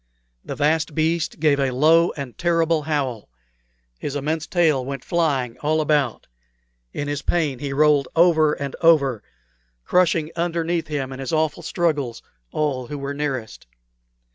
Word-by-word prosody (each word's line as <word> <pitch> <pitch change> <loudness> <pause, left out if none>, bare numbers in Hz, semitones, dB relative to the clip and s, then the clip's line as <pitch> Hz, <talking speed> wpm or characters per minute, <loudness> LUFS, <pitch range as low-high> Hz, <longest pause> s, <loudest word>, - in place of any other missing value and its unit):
The - - -6
vast 150 0 +1
beast 160 +1 0
gave 150 -2 +3
a 135 -1 +1
low 160 +6 +4
and 135 -4 -6
terrible 165 -2 +1
howl; 140 - -2 0.7
his 145 - -4
immense 155 +2 -2
tail 160 -7 +2
went 135 0 -6
flying 140 -8 0
all 155 +1 +1
about; 150 -5 0 0.7
in 145 - -4
his 145 0 -2
pain 150 -8 0
he 140 0 -4
rolled 145 -1 +3
over 160 -3 +4
and 140 -1 -5
over, 140 -9 +4 0.6
crushing 165 -3 +2
underneath 170 -1 -1
him 140 -3 -3
in 130 - -9
his 135 - -4
awful 160 +1 0
struggles 150 -9 -1 0.3
all 135 -5 -1
who 145 - -5
were 140 0 -4
nearest. 135 - -4
150 Hz, 145 wpm, -22 LUFS, 135-160 Hz, 0.7 s, low